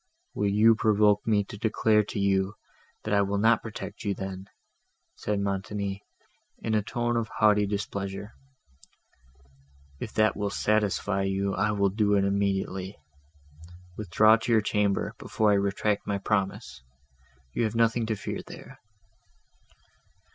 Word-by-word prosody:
"Will 105 - 0
you 110 +3 +5
provoke 105 -1 +2
me 105 -2 +3
to 100 +1 -10
declare 110 -1 +2
to 105 - -5
you, 95 0 +1 0.5
that 110 - -2
I 100 - +4
will 100 0 0
not 110 +2 +3
protect 110 -1 -8
you 100 -2 -1
then?" 95 0 -6 0.7
said 105 -1 -2
Montoni, 100 0 -3 0.6
in 110 - -3
a 110 - +3
tone 120 +3 -2
of 115 -1 0
haughty 105 -2 +3
displeasure. 100 0 -4 1.7
"If 110 - -5
that 110 -1 +2
will 105 -1 -2
satisfy 105 -2 0
you, 95 0 -1
I 105 +3 +1
will 100 -1 +2
do 105 +1 +1
it 100 - +3
immediately. 100 -1 -1 1.0
Withdraw 110 +3 +4
to 115 - -3
your 110 -2 +5
chamber, 105 -1 0
before 110 -1 +1
I - - +4
retract 100 +1 0
my 100 - 0
promise; 100 - -2 0.7
you 120 - 0
have 110 +1 -3
nothing 115 0 +2
to 110 - 0
fear 100 - -5
there." - - -12
105 Hz, 140 wpm, -27 LUFS, 100-110 Hz, 1.7 s, you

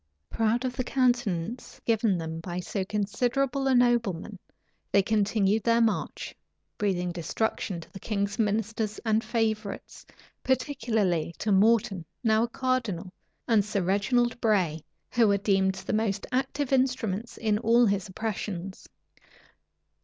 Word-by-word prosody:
Proud 230 +3 +1
of 250 -1 -2
the 255 - -1
countenance 240 -5 -1
given 220 -4 +2
them 160 -1 -4
by 175 +2 -5
so 190 +2 -3
considerable 245 +7 0
a 265 - +4
nobleman, 230 -6 +1 0.5
they 200 - +4
continued 210 0 +2
their 230 +1 +3
march, 225 -2 -1 0.5
breathing 180 -4 0
destruction 180 +2 -2
to - - -15
the 195 - -8
king's 200 +1 -2
ministers 215 0 0
and 220 0 +2
favorites, 220 -2 -2 0.4
particularly 225 - 0
to 215 - -1
Morton, 200 -2 +3 0.2
now 220 -1 +3
a 235 - +1
cardinal, 230 -8 -2 0.3
and 220 -3 +4
Sir 200 -2 -1
Reginald 240 +6 +1
Bray, 180 -8 +1 0.3
who 235 -2 +4
were 200 -1 +3
deemed 195 -1 +2
the 190 - -4
most 210 -2 0
active 270 +2 -1
instruments 240 -5 0
in 215 -2 +1
all 235 +2 +4
his 200 -3 0
oppressions. 190 -2 -5
215 Hz, 130 wpm, -27 LUFS, 195-235 Hz, 0.5 s, a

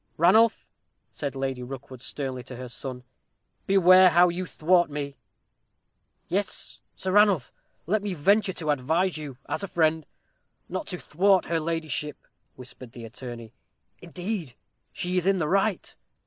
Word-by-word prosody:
"Ranulph," 215 +7 +4 0.4
said 140 -2 -5
Lady 135 -1 -3
Rookwood, 130 0 -9
sternly, 130 -2 -4
to 125 - -8
her 125 0 -7
son, 125 0 -7 0.6
"beware 185 -1 +7
how 175 +1 +5
you 180 +1 -4
thwart 175 +2 +2
me!" 145 -1 -5 1.1
"Yes, 195 +3 -3 0.2
Sir 190 - -3
Ranulph, 200 - +4 0.3
let 205 +6 +1
me 200 -2 -3
venture 195 +5 +3
to 155 -4 -1
advise 160 +7 0
you, 140 -4 -8
as - - -2
a 200 - -3
friend, 160 -3 +1 0.6
not 310 - -4
to 180 - -4
thwart 190 +4 +2
her 165 -1 0
ladyship," 160 -1 -2 0.4
whispered 125 -1 -12
the 120 -2 -9
attorney; 115 0 -9 0.5
"indeed, 175 - -5 0.4
she 180 -1 -2
is 180 +1 +1
in 195 0 +4
the 160 -4 0
right." 195 +2 0
165 Hz, 145 wpm, -26 LUFS, 135-185 Hz, 1.1 s, beware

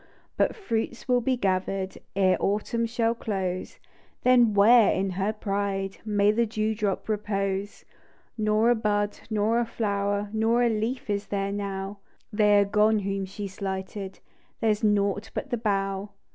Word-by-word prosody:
But - - +1
fruits 235 - -3
will 250 -1 +3
he 255 +2 0
gathered 190 -2 -1 0.2
Ere 190 -1 +4
autumn 220 +3 0
shall 230 0 +1
close; 190 -5 -3 0.5
Then, 240 -4 +5
where 220 +2 +7
in 190 0 0
her 195 +3 -1
pride 200 -2 -3
May 205 -1 +3
the 230 +2 +1
dew 215 0 -1
drop 210 -3 -2
repose 200 -2 -2
P - - -42 0.6
Nor 215 +2 +3
a - - +4
hud, 205 -1 0
nor 220 +2 +1
a 240 - +1
flower, 205 -2 -1
Nor 225 +2 +2
a 240 - +3
leaf 225 +4 -2
is 205 -1 -2
there 200 -1 -2
now; 200 0 -4 0.3
They 210 -1 +4
are 200 - +4
gone 210 +2 +3
whom 195 -1 -2
she 200 +2 -6
slighted 190 0 -5 0.2
— - - -38
There's 215 -1 +1
nought 205 -1 +1
but 275 - -4
the 240 - +1
bough. 195 -2 -1
205 Hz, 160 wpm, -26 LUFS, 195-220 Hz, 0.6 s, where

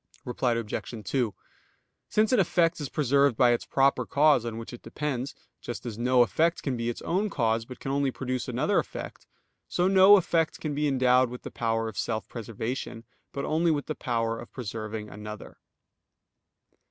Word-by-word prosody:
Reply 125 0 0
Obj. 115 0 -4
2: 120 -2 -1 0.7
Since 215 0 +2
an 250 - +4
effect 170 -3 +2
is 145 - -4
preserved 140 -3 +2
by 125 -2 +5
its 120 - -1
proper 135 0 +3
cause 145 -4 +4
on 115 -1 -4
which 115 +2 -8
it 120 - -9
depends; 135 +1 -4 0.3
just 120 - -6
as 115 -2 -5
no 125 0 +4
effect 165 +7 +1
can 135 -3 -1
be 115 0 -2
its 120 - -5
own 195 +5 0
cause, 115 - 0
but 125 +1 -10
can 135 - -4
only 140 0 +1
produce 130 -1 -3
another 135 - +1
effect, - - -7 0.4
so 180 +1 +1
no 195 +1 +8
effect 165 -3 0
can 155 -2 -3
be 150 +1 0
endowed 130 -2 +3
with 125 +1 -9
the - - -7
power 115 -1 -1
of 110 - -5
self 110 -2 -2
preservation, 115 +1 -5 0.3
but 140 - -4
only 165 +2 +1
with 145 -3 0
the 155 - -3
power 115 -5 -2
of - - -10
preserving 110 -2 -5
another. 105 +1 -9
125 Hz, 180 wpm, -27 LUFS, 115-150 Hz, 0.7 s, no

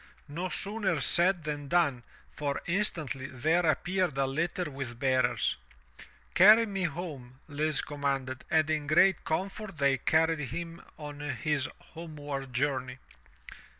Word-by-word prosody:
No 170 +5 -4
sooner 205 +2 0
said 175 0 +3
than 145 -1 -4
done, 155 -6 +2 0.3
for 145 -2 -2
instantly 165 -8 0
there 155 +8 +1
appeared 175 0 0
a 135 - +2
Utter 160 +4 -2
with 130 -4 -6
bearers. 130 0 +1 0.4
*' - - -19
Carry 215 +5 +8
me 195 -3 -2
home,'* 140 -6 -6
Lise 150 0 0
commanded, 135 -3 -3
and 155 -1 +3
in 150 -2 -1
great 175 +4 +4
comfort 195 +3 -3
they 140 -2 +2
carried 160 0 +2
him 165 +5 -5 0.2
on 145 -1 -8
his 145 0 -1 0.2
homeward 145 -5 -6
journey. 130 0 -1
150 Hz, 130 wpm, -29 LUFS, 135-170 Hz, 0.4 s, Carry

